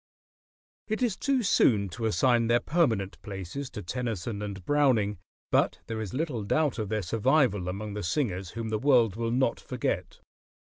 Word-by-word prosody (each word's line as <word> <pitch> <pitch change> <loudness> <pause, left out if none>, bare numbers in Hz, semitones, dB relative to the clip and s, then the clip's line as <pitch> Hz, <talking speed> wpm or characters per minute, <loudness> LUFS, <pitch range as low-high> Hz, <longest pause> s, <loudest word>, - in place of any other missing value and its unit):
] - - -80
It 220 +3 -1
is 230 -6 +1
too 270 -3 0
soon 105 - +3
to 110 +6 -3
assign 120 +1 +3
their 120 +1 +4
permanent 120 - 0
places 100 +7 -6
to 105 - -7
Tennyson 110 -1 -3
and 100 -3 -6
Browning; 125 -10 +2 0.3
but - - +2
there 110 -1 -4
is 105 -4 -5
little 140 -5 -2
doubt 135 +5 +1
of 105 -3 -3
their 110 -1 -1
survival 110 - +2
among 100 +3 -5
the 105 - -4
singers 95 - -1
whom 115 -1 -3
the 110 -1 -1
world 120 -6 +4
will 115 0 -2
not 125 0 +1
forget. - - -3
115 Hz, 175 wpm, -28 LUFS, 100-135 Hz, 0.3 s, their